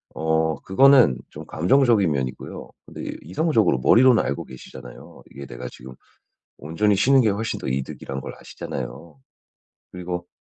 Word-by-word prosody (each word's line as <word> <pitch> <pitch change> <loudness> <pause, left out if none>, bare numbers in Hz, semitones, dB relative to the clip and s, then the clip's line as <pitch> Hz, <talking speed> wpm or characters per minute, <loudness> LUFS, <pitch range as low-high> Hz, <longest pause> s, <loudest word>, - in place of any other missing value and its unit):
어 80 -1 0
그거는 125 - +5
좀 - - -10
감정적인 105 - +2
면이고요. 65 -3 -5 0.2
근데 - - -7
이성적으로 105 - +1
머리로는 120 - +5
알고 70 - -3
계시잖아요. 65 -1 -13
이게 70 - -10
내가 60 0 -8
지금 65 +1 -12 0.6
온전히 100 +7 0
쉬는 135 +7 +4
게 115 - +2
훨씬 110 +2 -2
더 - - -7
이득이란 65 +1 -4
걸 - - -7
아시잖아요. 70 +4 -8 0.7
그리고 90 -1 -5
85 Hz, 340 characters per minute, -22 LUFS, 65-110 Hz, 0.7 s, 그거는